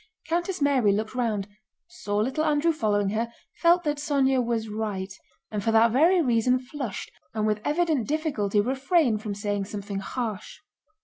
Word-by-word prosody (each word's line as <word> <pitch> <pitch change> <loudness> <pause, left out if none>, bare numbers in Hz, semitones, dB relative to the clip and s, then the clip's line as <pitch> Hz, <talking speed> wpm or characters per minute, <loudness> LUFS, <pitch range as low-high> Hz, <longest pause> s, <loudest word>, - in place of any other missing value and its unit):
Countess 345 0 -1
Mary 260 -7 +3
looked 215 +3 -2
round, 220 -6 -1 0.4
saw 205 -12 -4
little 260 +8 0
Andrew 305 +1 +2
following 205 -7 +1
her, 225 +3 -2 0.3
felt 345 +1 +4
that 295 -1 -1
Sónya 270 -3 +2
was 230 -1 -1
right, 210 -3 -4 0.4
and 210 -2 -3
for 225 - +1
that 225 +1 +5
very 335 +8 +4
reason 250 0 +3
flushed 255 -4 -6 0.2
and 215 -1 0
with 210 -1 0
evident 310 -5 +1
difficulty 275 -10 0
refrained 265 - +2
from 210 -2 -4
saying 205 -1 -2
something 200 -1 -5
harsh. 215 0 -5
235 Hz, 160 wpm, -26 LUFS, 210-295 Hz, 0.4 s, that